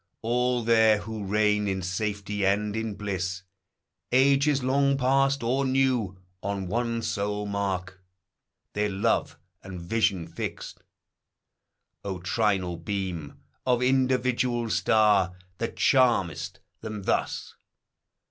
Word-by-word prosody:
All 125 Hz, +1 st, +1 dB
there, 110 Hz, -1 st, +5 dB
who 110 Hz, -2 st, -6 dB
reign 105 Hz, +1 st, +2 dB
in 95 Hz, -1 st, -2 dB
safety 100 Hz, +2 st, -2 dB
and 100 Hz, +2 st, +1 dB
in 110 Hz, -2 st, -3 dB
bliss, 95 Hz, -2 st, -3 dB, 0.7 s
Ages 140 Hz, +2 st, +4 dB
long 140 Hz, +1 st, +2 dB
past 135 Hz, 0 st, +2 dB
or 130 Hz, +4 st, +1 dB
new, 130 Hz, -7 st, +1 dB, 0.2 s
on 100 Hz, -1 st, -3 dB
one 115 Hz, +4 st, -1 dB
sole 105 Hz, 0 st, -2 dB
mark 100 Hz, -2 st, -3 dB, 0.7 s
Their 105 Hz, 0 st, 0 dB
love 100 Hz, +4 st, 0 dB, 0.2 s
and 95 Hz, -2 st, -8 dB
vision 95 Hz, -1 st, 0 dB
fixed. 85 Hz, -, -6 dB, 1.2 s
O 95 Hz, -2 st, -3 dB
trinal 90 Hz, -1 st, 0 dB
beam 90 Hz, -7 st, -4 dB, 0.2 s
Of 125 Hz, -1 st, +2 dB
individual 125 Hz, -2 st, +1 dB
star, 100 Hz, -4 st, +3 dB, 0.2 s
that 115 Hz, -, -3 dB
charm'st 120 Hz, -, +2 dB, 0.2 s
them 105 Hz, -2 st, -6 dB
thus -, -, -1 dB
105 Hz, 110 wpm, -27 LUFS, 95-125 Hz, 1.2 s, there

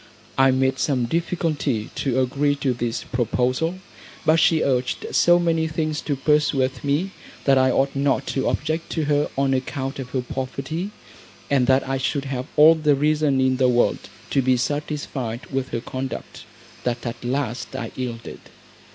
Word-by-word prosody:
I 135 Hz, 0 st, +5 dB
made 130 Hz, 0 st, +1 dB
some 130 Hz, -5 st, +1 dB
difficulty 155 Hz, -6 st, -1 dB
to 130 Hz, -2 st, 0 dB
agree 140 Hz, +3 st, +1 dB
to 140 Hz, -2 st, 0 dB
this 120 Hz, -1 st, -3 dB
proposal; 130 Hz, -, 0 dB, 0.5 s
but 155 Hz, +1 st, +5 dB
she 160 Hz, 0 st, +4 dB
urged 125 Hz, -2 st, 0 dB
so 175 Hz, 0 st, +5 dB
many 165 Hz, -2 st, +1 dB
things 155 Hz, -1 st, -2 dB
to 145 Hz, -, -2 dB
persuade 140 Hz, -2 st, +1 dB
me 150 Hz, +7 st, 0 dB, 0.3 s
that 135 Hz, -1 st, +4 dB
I 130 Hz, 0 st, +4 dB
ought 135 Hz, +2 st, +1 dB
not 140 Hz, -1 st, +1 dB
to 135 Hz, -, 0 dB
object 160 Hz, +3 st, -2 dB
to 160 Hz, -, 0 dB
her 145 Hz, 0 st, +1 dB
on 135 Hz, 0 st, +2 dB
account 135 Hz, +1 st, -3 dB
of 130 Hz, -2 st, -6 dB
her 130 Hz, 0 st, -1 dB
poverty, 135 Hz, +8 st, -4 dB, 0.6 s
and 130 Hz, -3 st, +3 dB
that 130 Hz, 0 st, +3 dB
I 135 Hz, 0 st, -1 dB
should 140 Hz, +2 st, -1 dB
have 130 Hz, -1 st, -4 dB
all 155 Hz, +2 st, +9 dB
the 150 Hz, -3 st, +2 dB
reason 150 Hz, -1 st, +2 dB
in 130 Hz, 0 st, +2 dB
the 130 Hz, -1 st, +3 dB
world 120 Hz, 0 st, +1 dB, 0.2 s
to 135 Hz, -, +3 dB
be 130 Hz, 0 st, +3 dB
satisfied 140 Hz, -3 st, -3 dB
with 135 Hz, -1 st, -2 dB
her 115 Hz, -, -3 dB
conduct, 130 Hz, +2 st, -6 dB, 0.4 s
that 120 Hz, 0 st, -2 dB
at 120 Hz, 0 st, -5 dB
last 125 Hz, 0 st, -3 dB
I 120 Hz, -4 st, -4 dB
yielded. 120 Hz, -3 st, -5 dB
135 Hz, 170 wpm, -23 LUFS, 130-150 Hz, 0.6 s, all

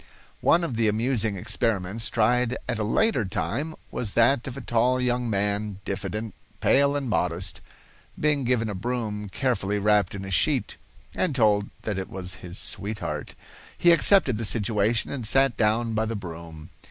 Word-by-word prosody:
One 170 Hz, +1 st, +3 dB
of 130 Hz, -9 st, -3 dB
the 115 Hz, -1 st, +2 dB
amusing 110 Hz, 0 st, +1 dB
experiments 110 Hz, +1 st, 0 dB
tried 125 Hz, +2 st, +1 dB
at 120 Hz, -3 st, -2 dB
a -, -, 0 dB
later 130 Hz, -, +2 dB
time 140 Hz, +10 st, -3 dB, 0.2 s
was 105 Hz, -5 st, -3 dB
that 120 Hz, +2 st, +3 dB
of 130 Hz, 0 st, -6 dB
a -, -, -6 dB
tall 125 Hz, +2 st, +1 dB
young 125 Hz, -1 st, 0 dB
man, 100 Hz, 0 st, -1 dB
diffident, 105 Hz, +2 st, -4 dB, 0.3 s
pale 140 Hz, +1 st, +3 dB
and 140 Hz, -2 st, -2 dB
modest, 90 Hz, -5 st, -1 dB, 0.6 s
being 150 Hz, -2 st, +1 dB
given 120 Hz, -2 st, +1 dB
a 105 Hz, -, -3 dB
broom 105 Hz, -1 st, -4 dB
carefully 105 Hz, -4 st, -1 dB
wrapped 105 Hz, -2 st, +2 dB
in 95 Hz, -1 st, -6 dB
a 95 Hz, -, -7 dB
sheet, 85 Hz, -, +1 dB, 0.4 s
and 170 Hz, -7 st, -1 dB
told 105 Hz, -4 st, +3 dB
that 105 Hz, -3 st, -2 dB
it 95 Hz, -, -6 dB
was 90 Hz, -1 st, -2 dB
his 90 Hz, +1 st, -5 dB
sweetheart. 100 Hz, -8 st, -3 dB, 0.4 s
He 175 Hz, -, +5 dB
accepted 170 Hz, -, +5 dB
the -, -, -3 dB
situation 110 Hz, +1 st, +1 dB
and 135 Hz, -4 st, -4 dB
sat 135 Hz, +3 st, +3 dB
down 115 Hz, +1 st, +1 dB
by 110 Hz, 0 st, 0 dB
the 115 Hz, +1 st, -3 dB
broom. 85 Hz, -4 st, -9 dB
110 Hz, 165 wpm, -25 LUFS, 100-125 Hz, 0.6 s, He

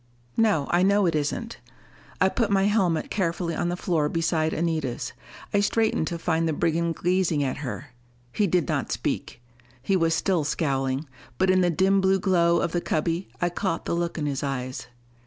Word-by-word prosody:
"No, 210 Hz, -11 st, +2 dB
I 175 Hz, -, +3 dB
know 200 Hz, +1 st, +4 dB
it 170 Hz, -, +2 dB
isn't." 155 Hz, +10 st, -2 dB, 0.6 s
I -, -, +5 dB
put 230 Hz, -4 st, 0 dB
my 195 Hz, -1 st, +3 dB
helmet 190 Hz, -6 st, +1 dB
carefully 170 Hz, -3 st, -1 dB
on 175 Hz, -, -1 dB
the 175 Hz, -, -2 dB
floor 160 Hz, -5 st, 0 dB
beside 160 Hz, -1 st, 0 dB
Anita's. 155 Hz, -7 st, -2 dB, 0.4 s
I 205 Hz, -, +4 dB
straightened 215 Hz, -5 st, +1 dB
to 170 Hz, -, -3 dB
find 165 Hz, -1 st, 0 dB
the 160 Hz, -, 0 dB
brigand 165 Hz, +1 st, 0 dB
gazing 175 Hz, -4 st, +1 dB
at 130 Hz, -2 st, -2 dB
her. 135 Hz, -1 st, -6 dB, 0.4 s
He 210 Hz, -, +2 dB
did 180 Hz, -4 st, +1 dB
not -, -, -1 dB
speak: 120 Hz, -, -3 dB, 0.4 s
he 195 Hz, +10 st, 0 dB
was 165 Hz, -2 st, +2 dB
still 175 Hz, -1 st, +1 dB
scowling. 135 Hz, -1 st, -1 dB, 0.3 s
But 190 Hz, 0 st, +3 dB
in 185 Hz, 0 st, +4 dB
the 175 Hz, -, +3 dB
dim 190 Hz, +3 st, +3 dB
blue 190 Hz, 0 st, +3 dB
glow 170 Hz, -3 st, +3 dB
of -, -, -1 dB
the 175 Hz, -, -1 dB
cubby, 165 Hz, +4 st, -1 dB
I 175 Hz, -, +1 dB
caught 175 Hz, 0 st, -2 dB
the -, -, -1 dB
look 170 Hz, 0 st, -2 dB
in 150 Hz, -, -2 dB
his 140 Hz, -2 st, -2 dB
eyes. 130 Hz, -3 st, -4 dB
170 Hz, 190 wpm, -25 LUFS, 155-190 Hz, 0.6 s, I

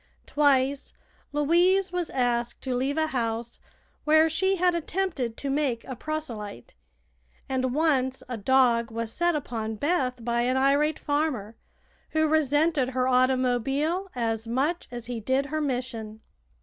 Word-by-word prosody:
Twice 280 Hz, -2 st, +1 dB, 0.4 s
Louise 350 Hz, +6 st, +3 dB
was 355 Hz, -2 st, -2 dB
asked 240 Hz, -2 st, -1 dB
to 260 Hz, -, -2 dB
leave 265 Hz, +4 st, -1 dB
a 315 Hz, -, +2 dB
house 235 Hz, -4 st, -3 dB, 0.4 s
where 315 Hz, +1 st, +5 dB
she 380 Hz, +5 st, +1 dB
had 360 Hz, -1 st, +2 dB
attempted 330 Hz, -8 st, -2 dB
to 275 Hz, -, -3 dB
make 270 Hz, -5 st, 0 dB
a 260 Hz, -, -6 dB
proselyte, 230 Hz, -, -6 dB, 0.7 s
and 260 Hz, -1 st, -1 dB
once 265 Hz, -5 st, +1 dB
a 245 Hz, -, -4 dB
dog 235 Hz, 0 st, +3 dB
was 230 Hz, 0 st, -4 dB
set 345 Hz, -1 st, +1 dB
upon 225 Hz, -6 st, -3 dB
Beth 255 Hz, -3 st, -1 dB
by 235 Hz, 0 st, +1 dB
an 255 Hz, +2 st, +1 dB
irate 285 Hz, +3 st, +2 dB
farmer, 290 Hz, -8 st, -2 dB, 0.6 s
who 315 Hz, 0 st, +3 dB
resented 300 Hz, -2 st, +2 dB
her 255 Hz, 0 st, 0 dB
automobile 260 Hz, -, +1 dB
as 225 Hz, -2 st, -2 dB
much 280 Hz, +9 st, -1 dB
as 240 Hz, -1 st, -7 dB
he 240 Hz, -1 st, -4 dB
did 260 Hz, +5 st, 0 dB
her 310 Hz, +2 st, -2 dB
mission. 245 Hz, -6 st, -4 dB
265 Hz, 140 wpm, -26 LUFS, 240-310 Hz, 0.7 s, where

